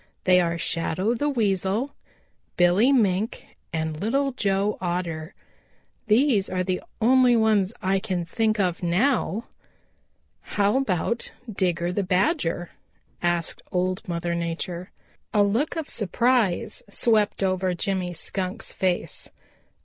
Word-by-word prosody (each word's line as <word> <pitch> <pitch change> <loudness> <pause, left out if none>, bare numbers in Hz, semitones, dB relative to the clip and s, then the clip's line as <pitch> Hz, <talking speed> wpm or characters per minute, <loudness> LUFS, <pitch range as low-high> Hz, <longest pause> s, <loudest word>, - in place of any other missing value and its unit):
They 180 -1 +5
are 170 -1 0
Shadow 170 +6 0
the 290 +5 0
Weasel, 215 +1 0 0.6
Billy 180 +9 +5
Mink 215 -4 +1 0.3
and 160 -1 -2
Little 275 +6 +1
Joe 200 -4 0
Otter. 170 -3 -3 0.7
These 220 -2 +3
are 185 0 -1
the 185 0 -1 0.2
only 250 +1 +5
ones 215 -4 +3
I 190 +1 +2
can 185 -4 -2
think 215 +4 0
of 180 -3 0
now." 215 +4 +1 1.1
"How 205 +4 +3
about 235 -1 -1 0.2
Digger 175 -3 0
the 205 - 0
Badger?" 185 - 0 0.5
asked 175 -1 -1
Old 185 +1 0
Mother 170 0 -2
Nature. 170 +2 -4 0.5
A 205 - +6
look 225 +12 0
of 320 -3 -3
surprise 220 -1 +1
swept 210 -1 +2
over 185 -1 0
Jimmy 185 0 -1
Skunk's 185 +2 -3
face. 185 -2 -1
190 Hz, 120 wpm, -25 LUFS, 175-220 Hz, 1.1 s, A